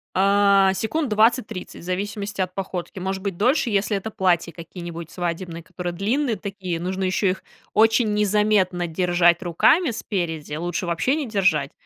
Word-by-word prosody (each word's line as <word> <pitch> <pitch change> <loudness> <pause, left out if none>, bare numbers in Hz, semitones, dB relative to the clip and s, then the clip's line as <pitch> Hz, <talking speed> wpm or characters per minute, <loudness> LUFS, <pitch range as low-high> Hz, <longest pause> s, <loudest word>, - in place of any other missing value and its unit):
А, 195 0 +4
секунд 285 +8 -1
20-30, 220 -1 +1
в - - -13
зависимости 200 +3 -4
от 185 -1 -1
походки, 185 -1 -5
может 190 +1 -3
быть, 200 -3 -2
дольше, 245 - +2
если 205 +1 +1
это 220 +3 -5
платья 175 -4 +1
какие-нибудь 170 0 -8
свадебные, 170 -1 -4
которые 175 +1 -5
длинные 230 - 0
такие, 195 -5 -5
нужно 185 +2 -3
ещё 190 +2 +1
их 185 - -3 0.3
очень 220 0 +4
незаметно 210 -3 +2
держать 175 0 +2
руками 225 - +3
спереди, 170 -10 -3
лучше 175 +3 -3
вообще 170 - +1
не 300 -5 -3
держать, 180 -10 +1
190 Hz, 150 wpm, -23 LUFS, 175-210 Hz, 0.3 s, А